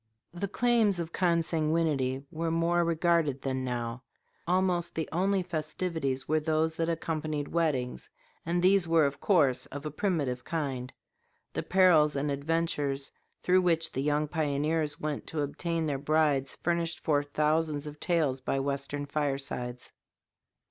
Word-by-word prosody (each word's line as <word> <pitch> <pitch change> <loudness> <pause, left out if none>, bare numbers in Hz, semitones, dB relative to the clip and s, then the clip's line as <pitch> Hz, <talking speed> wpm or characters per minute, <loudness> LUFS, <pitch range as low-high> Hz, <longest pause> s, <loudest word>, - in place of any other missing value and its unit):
The 175 +3 -3
claims 220 -2 +2
of 170 -1 -4
consanguinity 160 -6 +1
were 165 +1 -2
more 170 +1 +2
regarded 165 -4 +1
than 130 -1 -1
now. 120 -1 -3 0.5
Almost 180 -1 +1
the 160 - -2
only 190 +3 +1
festivities 155 -4 -2
were 155 0 +2
those 160 +1 0
that 165 0 0
accompanied 155 -3 -2
weddings, 150 -7 -1 0.3
and 175 +1 0
these 190 -1 +5
were, 165 -2 +4
of 140 0 -2
course, 145 -10 +3
of 145 +2 -8
a 150 - -3
primitive 145 -8 -1
kind. 135 -6 -3 0.6
The - - -1
perils 175 -6 +4
and 145 +1 -1
adventures 140 -2 -1 0.3
through 185 +1 +4
which 165 -2 +2
the 135 - -2
young 150 +1 +1
pioneers 150 0 -1
went 150 -1 -3
to 155 - -2
obtain 165 +3 -2
their 140 -3 -1
brides 145 -2 +1
furnish 170 -1 0
forth 145 -2 0
thousands 155 -1 +1
of 150 0 -8
tales 150 -7 +1
by 135 - -1
Western 140 +1 -2
firesides. 135 -4 -3
155 Hz, 140 wpm, -29 LUFS, 140-170 Hz, 0.6 s, these